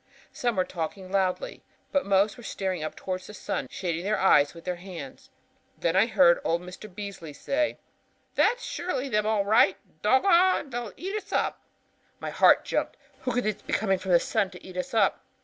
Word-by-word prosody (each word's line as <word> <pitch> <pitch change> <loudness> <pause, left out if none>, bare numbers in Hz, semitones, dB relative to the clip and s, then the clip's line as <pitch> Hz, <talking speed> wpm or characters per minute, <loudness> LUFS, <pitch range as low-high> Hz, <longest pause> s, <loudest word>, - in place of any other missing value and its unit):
Some 240 -2 -1
were 185 - +2
talking 185 +2 -5
loudly, 195 - -1 0.3
but 280 -7 +1
most 200 +1 +3
were - - -12
staring 190 -6 -3
up 155 - -4
toward 185 -1 -4
the 210 +3 -11
sun, 200 -2 -3
shading 170 -2 -3
their 210 +2 +1
eyes 145 -5 +4
with 165 - -12
their 180 -1 -2
hands. 175 -7 -9 0.5
Then 170 +1 0
I 200 +4 +5
heard 185 -6 +5
old 170 +2 0
Mr. 180 +3 -10
Beasley 190 -5 -7
say: 295 - -1 0.6
'That's - - +2
surely 310 -6 -3
them 210 -2 +1
all 215 -2 +1
right; 200 -2 +4 0.2
doggon, 340 - +4
they'll 240 -2 -4
eat 385 +3 -4
us 420 -1 -5
up.' - - 0 0.6
"My - - -4
heart - - +5
jumped. - - -2 0.2
Who 255 - -2
could 245 +1 0
be 215 -1 -3
coming 195 -3 +2
from 185 -1 -1
the 170 - +7
sun 195 - 0
to 180 -1 -13
eat 185 - -10
us 180 +5 -4
up? 205 -3 +2
195 Hz, 190 wpm, -27 LUFS, 180-240 Hz, 0.6 s, the